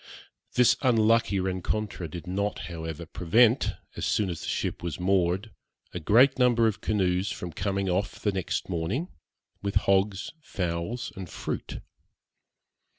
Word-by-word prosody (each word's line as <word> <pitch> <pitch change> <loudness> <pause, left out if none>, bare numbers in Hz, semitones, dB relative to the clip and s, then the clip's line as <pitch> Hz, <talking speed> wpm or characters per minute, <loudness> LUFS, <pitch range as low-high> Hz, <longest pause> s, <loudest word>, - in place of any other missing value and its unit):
This 125 0 +6
unlucky 115 -4 +3
rencontre 95 0 -2
did 85 +2 -7
not, 100 +3 -1
however, 80 0 -5
prevent, 110 - +3 0.2
as - - -5
soon 100 -4 +1
as 85 - -6
the - - -6
ship - - -2
was 85 -2 -4
moored, 95 +3 +1 0.4
a 90 - -3
great 120 - +5
number 120 -2 +4
of 110 -3 0
canoes 95 -2 +1
from 90 -3 -6
coming 100 0 -1
off 95 +3 -1
the 105 - +1
next 95 -2 -2
morning, 95 - -2 0.5
with 100 -1 -3
hogs, 100 0 +2
fowls, 90 - -3
and 95 -3 -7
fruit. - - -5
95 Hz, 140 wpm, -27 LUFS, 90-110 Hz, 0.5 s, This